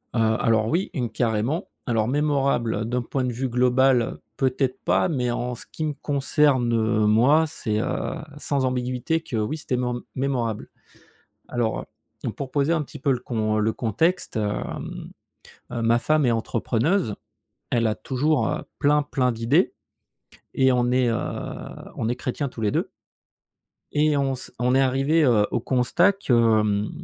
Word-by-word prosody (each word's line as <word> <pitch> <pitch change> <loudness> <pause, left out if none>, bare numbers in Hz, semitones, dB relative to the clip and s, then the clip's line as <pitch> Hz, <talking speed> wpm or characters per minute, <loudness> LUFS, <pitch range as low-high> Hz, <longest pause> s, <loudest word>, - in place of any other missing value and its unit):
Heu, - - +2 0.2
alors 110 -1 +2
oui, 170 +10 0
une, 125 -3 -2
carrément. 115 - -1 0.2
Alors, 115 -2 +1
mémorable 135 -6 +1
d'un 125 +2 -1
point 130 +2 -2
de 125 - -2
vue 130 +3 -2
global, 125 0 +3 0.2
peut-être 130 -1 0
pas, 95 +2 +2
mais 125 -5 0
en 120 +1 -2
ce - - -10
qui 155 - -5
me 155 -1 -1
concerne 140 -2 +2 0.4
moi, 125 +10 +5
c'est 110 -8 -2
heu, - - -2 0.2
sans 140 -2 -1
ambiguïté 125 +5 -1
que 130 - -6
oui, 110 +8 -1
c'était 140 -4 -2
mém 125 -1 -2
mémorable. 125 -5 -2 0.8
Alors 120 -2 -1 0.4
heu, - - 0
pour 135 -2 -6
poser 145 +3 +1
un 165 -2 +1
petit 145 +1 -10
peu 140 +1 +1
le 125 - 0
con 110 -3 -1
le 110 +1 +1
contexte 145 - 0
hem, 105 -1 -4 0.6
heu, 120 -1 -2
ma 115 +1 +3
femme 155 +2 +2
est - - +3
entrepreneuse. 115 - 0 0.6
Elle 115 -1 +2
a 110 - +1
toujours, 135 0 0
heu, - - -2 0.2
plein, 150 +1 +3
plein 130 -3 0
d'idées 120 +10 +2 0.8
et 130 0 +4
on 125 -1 +2
est 125 -1 +3
heu, 115 - +1 0.8
on 110 - -2
est 120 - 0
chrétiens 130 +3 -3
tous 120 - -9
les 105 -2 +1
2 - - -1 1.0
et 150 0 +2
on 135 -1 +1
se 130 - -8
on 125 +1 +2
est 135 - +5
arrivés, 135 +5 +2
heu, 110 -5 +4
au - - +1
constat 135 - +2
que, 195 -9 -1 0.3
hem, 105 0 0
125 Hz, 165 wpm, -24 LUFS, 115-140 Hz, 1.0 s, moi